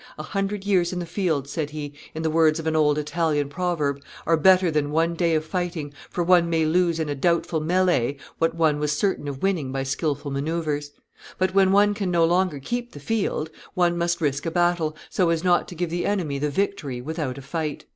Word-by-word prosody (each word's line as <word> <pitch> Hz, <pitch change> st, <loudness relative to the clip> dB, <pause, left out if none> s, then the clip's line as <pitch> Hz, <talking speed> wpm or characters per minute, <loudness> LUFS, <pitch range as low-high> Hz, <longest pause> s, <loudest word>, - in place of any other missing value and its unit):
"A 155 Hz, -, -5 dB
hundred 195 Hz, +3 st, -3 dB
years 185 Hz, -4 st, +2 dB
in 180 Hz, -, -4 dB
the 175 Hz, -, -3 dB
field," 165 Hz, -6 st, -1 dB
said 150 Hz, +1 st, -3 dB
he, 150 Hz, -1 st, -6 dB, 0.2 s
in 160 Hz, -, -3 dB
the 160 Hz, -, +1 dB
words 160 Hz, -1 st, +4 dB
of 165 Hz, -, -5 dB
an 160 Hz, 0 st, 0 dB
old 150 Hz, -1 st, +3 dB
Italian 150 Hz, -1 st, 0 dB
proverb, 150 Hz, -4 st, -1 dB, 0.2 s
"are 165 Hz, -, +4 dB
better 185 Hz, +1 st, +5 dB
than 150 Hz, -1 st, 0 dB
one 165 Hz, +3 st, +1 dB
day 170 Hz, -1 st, +1 dB
of 155 Hz, 0 st, 0 dB
fighting, 165 Hz, -4 st, -3 dB, 0.2 s
for 175 Hz, -, -1 dB
one 170 Hz, -1 st, +4 dB
may 165 Hz, -1 st, +2 dB
lose 170 Hz, +1 st, +2 dB
in 160 Hz, -, -1 dB
a 145 Hz, -, -1 dB
doubtful 165 Hz, +2 st, +1 dB
melley 170 Hz, -6 st, +1 dB, 0.2 s
what 165 Hz, 0 st, +1 dB
one 155 Hz, -3 st, +2 dB
was 150 Hz, 0 st, 0 dB
certain 190 Hz, -6 st, 0 dB
of 135 Hz, -2 st, -6 dB
winning 175 Hz, -9 st, 0 dB
by 135 Hz, 0 st, -2 dB
skilful 145 Hz, +1 st, -2 dB
manoeuvres; 150 Hz, 0 st, -2 dB, 0.5 s
but 185 Hz, 0 st, +1 dB
when 190 Hz, -1 st, +4 dB
one 205 Hz, +1 st, +5 dB
can 200 Hz, -2 st, -2 dB
no 170 Hz, -2 st, +3 dB
longer 175 Hz, -2 st, +1 dB
keep 240 Hz, -, -4 dB
the -, -, -9 dB
field, 200 Hz, -8 st, -1 dB, 0.2 s
one 175 Hz, -1 st, +2 dB
must 170 Hz, 0 st, 0 dB
risk 140 Hz, -2 st, 0 dB
a -, -, +2 dB
battle, 175 Hz, -2 st, +1 dB
so 180 Hz, -3 st, +1 dB
as 165 Hz, 0 st, 0 dB
not 175 Hz, -1 st, +3 dB
to 180 Hz, -, -9 dB
give 170 Hz, 0 st, -2 dB
the 175 Hz, +1 st, -1 dB
enemy 170 Hz, -9 st, -1 dB
the 150 Hz, +1 st, 0 dB
victory 145 Hz, -6 st, -2 dB
without 145 Hz, -1 st, -4 dB
a -, -, -7 dB
fight." 150 Hz, +1 st, -4 dB
165 Hz, 220 wpm, -24 LUFS, 150-180 Hz, 0.5 s, better